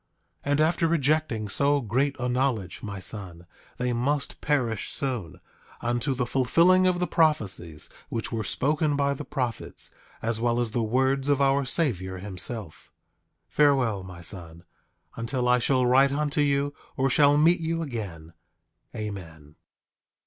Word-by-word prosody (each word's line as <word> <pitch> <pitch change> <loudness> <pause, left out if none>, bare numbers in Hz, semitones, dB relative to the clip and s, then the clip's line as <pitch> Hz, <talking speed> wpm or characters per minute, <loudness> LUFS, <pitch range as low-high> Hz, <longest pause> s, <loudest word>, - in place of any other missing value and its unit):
8:29 145 - -1
And 145 +1 +3
after 165 +1 +2
rejecting 150 -8 +1
so 140 +8 +2
great 135 +4 0
a 125 - -1
knowledge, 125 -7 -1
my 100 -2 -6
son, 95 -4 -6 0.3
they 125 0 -1
must 140 +4 -1
perish 120 -8 0
soon, 105 -11 -3 0.4
unto 120 +3 -1
the 125 -1 -1
fulfilling 170 +9 +4
of 180 -1 +2
the 180 - 0
prophecies 105 - 0 0.2
which 115 - -3
were 115 -1 -2
spoken 150 - +1
by 140 0 +1
the 140 - -6
prophets, 125 -4 -3 0.3
as 115 0 -1
well 120 0 +1
as 120 -2 0
the 120 - 0
words 130 +4 +1
of 140 -1 +3
our 140 0 +3
Savior 105 - 0
himself. 100 0 -2 0.6
8:30 - - -32
Farewell, 130 -9 +3
my 90 -2 -10
son, 85 -2 -5 0.5
until 125 +2 -2
I 125 0 +4
shall 130 +1 +2
write 135 +2 +5
unto 150 +1 0
you, 140 0 +1 0.2
or 135 - +2
shall 145 +2 +5
meet 165 +4 +4
you 165 0 -2
again. 95 - -6 0.6
Amen. 85 -9 -7
125 Hz, 150 wpm, -26 LUFS, 105-145 Hz, 0.6 s, write